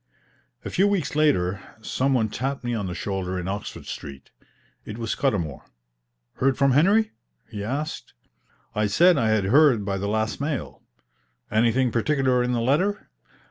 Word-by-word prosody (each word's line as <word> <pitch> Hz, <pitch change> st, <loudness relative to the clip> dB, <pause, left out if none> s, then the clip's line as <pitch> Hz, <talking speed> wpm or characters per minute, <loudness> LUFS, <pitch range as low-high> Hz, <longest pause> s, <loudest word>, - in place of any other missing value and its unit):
A -, -, -4 dB
few 195 Hz, -, +3 dB
weeks 195 Hz, -8 st, -1 dB
later 100 Hz, -12 st, +2 dB, 0.2 s
some 130 Hz, +4 st, 0 dB
one 110 Hz, -3 st, +2 dB
tapped 135 Hz, +6 st, -3 dB
me 120 Hz, 0 st, -2 dB
on 105 Hz, -4 st, -2 dB
the 90 Hz, -, -5 dB
shoulder 95 Hz, -2 st, -3 dB
in 90 Hz, -, -5 dB
Oxford 100 Hz, +1 st, -5 dB
Street. 70 Hz, -1 st, -8 dB, 0.5 s
It 105 Hz, -, -8 dB
was 115 Hz, -2 st, -3 dB
Scudamour. 95 Hz, -, -1 dB, 0.8 s
"Heard 135 Hz, 0 st, +2 dB
from 140 Hz, -1 st, +3 dB
Henry?" 200 Hz, -, +4 dB, 0.4 s
he 100 Hz, -1 st, -5 dB
asked. 145 Hz, +8 st, -4 dB, 0.6 s
I 105 Hz, 0 st, +1 dB
said 170 Hz, -, +4 dB
I 115 Hz, -2 st, +2 dB
had 110 Hz, -2 st, +2 dB
heard 125 Hz, 0 st, +4 dB
by 100 Hz, -1 st, -2 dB
the 100 Hz, -, -2 dB
last 110 Hz, +4 st, -1 dB
mail. 145 Hz, -3 st, -4 dB, 0.7 s
"Anything 120 Hz, +3 st, +2 dB
particular 130 Hz, +1 st, +1 dB
in 125 Hz, 0 st, 0 dB
the 120 Hz, -1 st, 0 dB
letter?" 170 Hz, -, 0 dB
120 Hz, 160 wpm, -24 LUFS, 105-140 Hz, 0.8 s, Henry